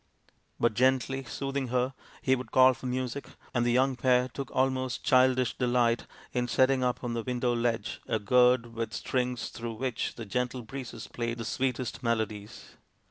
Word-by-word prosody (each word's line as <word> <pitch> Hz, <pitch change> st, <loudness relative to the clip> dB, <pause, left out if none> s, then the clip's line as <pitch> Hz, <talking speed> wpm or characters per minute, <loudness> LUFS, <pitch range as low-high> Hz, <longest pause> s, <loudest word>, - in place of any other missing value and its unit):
But, 120 Hz, -1 st, +3 dB
gently 130 Hz, +2 st, +2 dB
soothing 135 Hz, +1 st, -3 dB
her, 125 Hz, +2 st, 0 dB, 0.3 s
he 130 Hz, -, +4 dB
would 125 Hz, -3 st, -7 dB
call 130 Hz, 0 st, +7 dB
for 130 Hz, 0 st, -7 dB
music, 130 Hz, +2 st, -3 dB, 0.3 s
and 120 Hz, -, +2 dB
the 120 Hz, -, +2 dB
young 130 Hz, +2 st, +3 dB
pair 125 Hz, 0 st, +3 dB
took 135 Hz, +1 st, -6 dB
almost 130 Hz, -1 st, 0 dB
childish 130 Hz, -1 st, +4 dB
delight 120 Hz, -2 st, +1 dB, 0.3 s
in 125 Hz, -1 st, 0 dB
setting 130 Hz, +2 st, +3 dB
up 125 Hz, 0 st, -1 dB
on 120 Hz, -1 st, -2 dB
the 115 Hz, -, -1 dB
window 125 Hz, 0 st, 0 dB
ledge 115 Hz, -1 st, -1 dB
a -, -, +1 dB
gourd 125 Hz, +2 st, +3 dB
with 115 Hz, 0 st, -3 dB
strings 125 Hz, -2 st, -1 dB
through 115 Hz, 0 st, -6 dB
which 125 Hz, 0 st, -2 dB
the 115 Hz, -, -7 dB
gentle 125 Hz, +3 st, -2 dB
breezes 120 Hz, -1 st, -7 dB
played 120 Hz, 0 st, -3 dB
the 115 Hz, -, -5 dB
sweetest 125 Hz, 0 st, -2 dB
melodies. 110 Hz, -3 st, -3 dB
125 Hz, 170 wpm, -29 LUFS, 120-130 Hz, 0.3 s, call